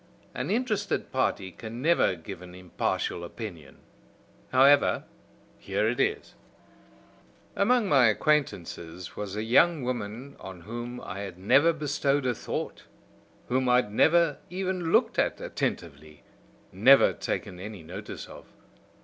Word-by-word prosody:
An - - -4
interested 215 -3 -1
party 100 -7 -1
can 115 +5 -8
never 160 - +3
give 80 +1 -9
an 90 0 -11
impartial 90 -1 -2
opinion. 85 -6 -9 0.7
However, 140 +2 +5 0.6
here - - -1
it - - -1
is: - - -1 1.2
"Among 230 +2 +3
my 135 -8 +5
acquaintances 95 - -1
was 100 -1 -5
a 105 - -2
young 150 +6 +4
woman 125 +2 -5
on 95 -2 -9
whom 120 +5 -6
I 95 - -7
had 95 -3 -6
never 140 - +4
bestowed 145 -3 0
a 125 - +2
thought, - - -5 0.6
whom 130 0 +1
I 125 - +5
had 125 -5 +2
never 165 +4 +3
even 185 -2 -2
looked - - +3
at - - +1
attentively, 75 -2 -5 0.5
never 125 +9 +6
taken 90 - -4
any 100 -2 -8
notice 95 +6 -8
of. - - -13
120 Hz, 130 wpm, -27 LUFS, 95-145 Hz, 1.2 s, never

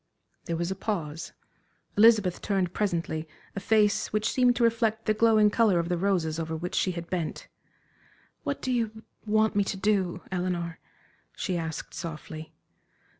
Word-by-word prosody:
'" - - -45
There 165 - -2
was 170 +2 -1
a - - -2
pause. 170 -6 -3 0.6
Elizabeth 210 -4 +5
turned 190 -3 0
presently 165 -5 -1 0.3
a - - -2
face 210 0 +2
which 215 +1 +1
seemed 250 -1 +4
to 240 - +1
reflect 225 -1 +1
the 215 - +3
glowing 215 -1 +4
color 215 -5 +4
of 170 0 0
the 175 - +1
roses 170 -5 +1
over 160 0 -3
which 175 +2 -5
she 185 - +1
had 170 -1 -6
bent. 175 -4 -3 1.0
"What 285 -2 -3
do 260 - 0
you 225 -2 -1 0.2
want 215 0 +3
me 205 - +4
to 195 - -3
do, 190 -3 0
Eleanor?" 175 -2 -2 0.6
she 185 - -2
asked, 160 -2 -4
softly. 160 -1 -7
190 Hz, 165 wpm, -28 LUFS, 170-215 Hz, 1.0 s, Elizabeth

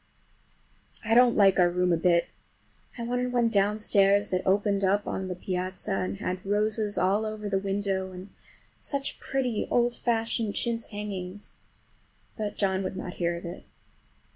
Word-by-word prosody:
I 225 - +1
don't 245 0 +6
like 195 -2 +5
our 175 -1 +5
room 180 0 +1
a - - +2
bit. 170 0 +2 0.7
I 235 - -4
wanted 245 +1 -1
one 240 -2 +2
downstairs 205 -1 +3
that 185 0 0
opened 200 +1 +2
on 190 -1 0
the 180 - -4
piazza 185 +1 -4
and 95 0 -2
had 185 - -4
roses 210 +1 0
all 200 +4 +2
over 215 -1 -4
the 195 -1 0
window, 195 -1 -2
and 185 +2 -10 0.5
such 280 -1 -3
pretty 255 -5 -2
old 240 0 +2
fashioned 225 -2 -1
chintz 230 -1 -1
hangings! 205 -2 -6 0.8
but 210 -2 -4
John 190 -2 +1
would 190 0 -4
not 180 - -5
hear 170 0 0
of 170 - -9
it. 170 +1 -7
200 Hz, 155 wpm, -27 LUFS, 185-220 Hz, 0.8 s, don't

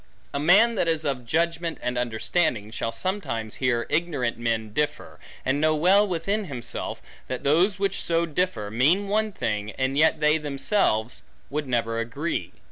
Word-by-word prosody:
A 140 - -1
man 200 +10 +5
that 190 -6 0
is 160 -1 0
of 125 -4 -2
judgment 165 +3 0
and 125 0 -2
understanding, 120 -1 0
shall 115 0 -3
sometimes 115 - -3
hear 120 -2 +1
ignorant 145 -8 0
men 115 -2 -1
differ, 150 +5 -2 0.3
and 135 +2 +1
know 155 0 +3
well 190 +7 +4
within 195 +4 -1
himself, 130 -8 -4 0.2
that 130 - -4
those 175 +8 +3
which 195 -1 -1
so 170 0 +1
differ, 150 - -2
mean 165 - +2
one 215 +1 +1
thing, 105 - -2
and 130 +1 -1
yet 155 +2 +4
they 150 +1 +3
themselves 140 - 0 0.3
would 145 0 -2
never 115 -2 0
agree. 135 +9 -3
150 Hz, 160 wpm, -25 LUFS, 120-175 Hz, 0.3 s, man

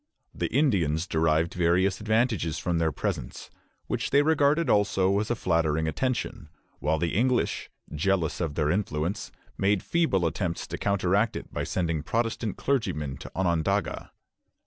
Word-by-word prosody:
The - - -2
Indians 95 - +2
derived 80 -1 +1
various 90 +2 +2
advantages 110 -7 +1
from 85 -2 -1
their 80 -1 +1
presence, 85 - -4 0.3
which - - -2
they 140 +1 +4
regarded 155 0 +3
also 100 -3 +3
as 105 - -2
a 120 - +1
flattering 80 -6 +1
attention; 115 - -2 0.3
while 75 +2 +1
the 85 +1 -1
English, 125 +4 +1 0.2
jealous 85 +1 0
of 80 -4 -2
their 75 -1 +1
influence, 90 -1 -2 0.3
made 100 0 +2
feeble 160 - +1
attempts 85 +1 -2
to - - -6
counteract 100 +2 +1
it - - -7
by - - -2
sending 85 -4 -1
Protestant 115 +3 -2
clergymen 80 - -1
to - - -10
Onondaga. 95 +1 0
95 Hz, 145 wpm, -27 LUFS, 80-110 Hz, 0.3 s, they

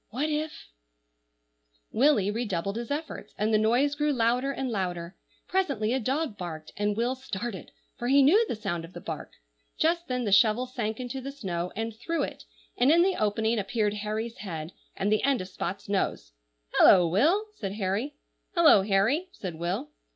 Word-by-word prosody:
What 290 +7 -1
if— 305 +1 -3 1.3
Willy 230 -6 +3
redoubled 200 -4 -2
his 235 0 -4
efforts, 285 -7 -5
and 215 +2 +1
the 215 - +5
noise 245 +7 +3
grew 295 +1 +1
louder 250 +1 +1
and 265 -2 -3
louder; 180 -3 -3 0.3
presently 240 - 0
a 265 - +1
dog 265 0 -2
barked, 160 -3 -6
and 205 0 -1
Will 240 +2 +1
started, 240 -6 -6 0.3
for 240 - -2
he 275 +2 +6
knew 380 +12 +6
the - - -2
sound 185 -6 -3
of 165 +2 -11
the - - -7
bark. - - -7 0.4
Just 340 +2 +1
then 250 -1 -1
the 205 - -1
shovel 215 +5 +5
sank 235 -4 -3
into 255 +1 -4
the 275 +2 -5
snow 180 -10 -4
and 225 +1 -3
through 330 +9 -2
it, - - -6 0.3
and 250 +3 +3
in 340 +2 +6
the 380 0 +2
opening 220 +2 +1
appeared 205 +1 0
Harry's 215 +2 -4
head, 165 -5 -5 0.2
and 200 +2 0
the 215 - +3
end 275 -3 +2
of 185 - -6
Spot's 195 +1 -5
nose. 190 - -1 0.5
"Hullo, 180 -3 +7
Will!" 315 - +3
said 195 - -5
Harry. 210 +8 -2 0.4
"Hullo, 325 - +7
Harry!" 210 - +2
said 185 - -6
Will. 185 - -3
225 Hz, 180 wpm, -28 LUFS, 195-275 Hz, 1.3 s, Hullo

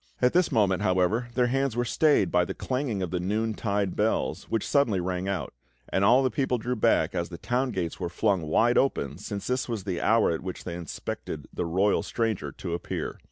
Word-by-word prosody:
At 125 0 +3
this 180 -2 +3
moment, 100 -7 +2
however, 95 +6 +1
their 125 -1 +3
hands 135 0 0
were 120 - +1
stayed 145 - +3
by 90 0 +4
the - - -5
clanging 125 -7 -2
of 90 - -4
the 90 - -1
noon 110 +5 -1
tide 100 -3 -1
bells, 110 +2 0
which 115 -2 -2
suddenly 140 -10 +2
rang 90 +1 -2
out; 100 -4 -3 0.4
and 95 - +1
all 120 +6 +6
the 130 - +1
people 130 +1 0
drew 125 +2 -2
back 105 -7 +2
as 85 -2 -2
the 85 - -7
town 125 +8 0
gates 90 -7 -3
were 90 -2 -2
flung 95 +1 +1
wide 115 +10 +4
open, 75 - -1
since 100 -1 -5
this 125 0 -1
was 110 -5 -3
the 95 -3 -3
hour 110 -1 +3
at 80 - -2
which 90 -1 -6
they 85 - -5
expected 85 -2 -6
the - - -2
royal 95 +5 +2
stranger 115 -4 -2
to 85 -3 -6
appear. 85 - -4
105 Hz, 215 wpm, -27 LUFS, 90-120 Hz, 0.4 s, all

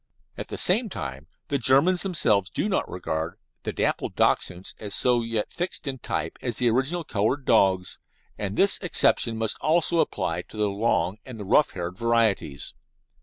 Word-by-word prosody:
At - - -6
the - - -6
same 215 +5 +2
time 65 - -6 0.2
the 140 - 0
Germans 140 +9 +4
themselves 110 - +1
do - - -2
not 195 - -1
regard 80 -2 -4 0.2
the - - -3
dapple - - -1
Dachshunds 90 +1 0
as 105 -2 -3 0.3
yet 115 -2 -2
so - - -16
fixed 175 0 -3
in 135 -2 -4
type 80 -6 -3
as 120 -4 -3
the 120 -2 +2
original 140 +9 0
coloured 120 +3 -1
dogs, 95 -5 +2 0.4
and 100 -1 -4
this 195 0 +4
exception 125 - +2
must 110 -1 -1
also 165 +1 +3
apply - - -1
to - - -14
the 105 -1 +1
long 100 -2 0
and 125 -4 -10
the 105 - -6
rough 150 +9 +3
haired 90 0 -5
varieties. 115 -11 0
115 Hz, 170 wpm, -25 LUFS, 95-150 Hz, 0.4 s, Germans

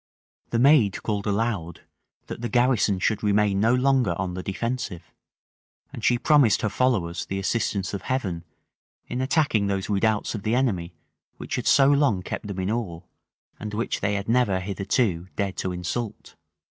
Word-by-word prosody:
The 115 - -1
maid 125 -5 +4
called 105 -1 -2
aloud, 100 -5 -2 0.4
that - - -7
the 120 - -3
garrison 120 -5 +2
should 105 +3 0
remain 105 -1 +2
no 115 +4 +3
longer 125 -8 +2
on 90 -1 -3
the 90 - -4
defensive; 100 -3 -4 0.8
and - - -8
she 120 - +3
promised 135 -4 +4
her 110 - +1
followers 95 -9 0
the 95 - -3
assistance 95 -1 -1
of 100 - -3
Heaven 95 -11 -2 0.6
in 125 - -4
attacking 130 -7 +1
those 100 +1 -2
redoubts 105 +1 +1
of 110 - -4
the 110 +4 0
enemy 95 -10 -1 0.4
which - - -5
had - - -3
so 135 - +6
long 140 -10 +3
kept 105 - -5
them 100 -2 -5
in 95 +3 -1
awe, 95 -8 -3 0.6
and 105 0 -5
which 115 - -2
they 100 - 0
had 100 0 -3
never 115 -5 +2
hitherto 95 -1 -1
dared 100 -2 -2
to 95 - -2
insult. 90 +6 -5
105 Hz, 170 wpm, -25 LUFS, 95-120 Hz, 0.8 s, so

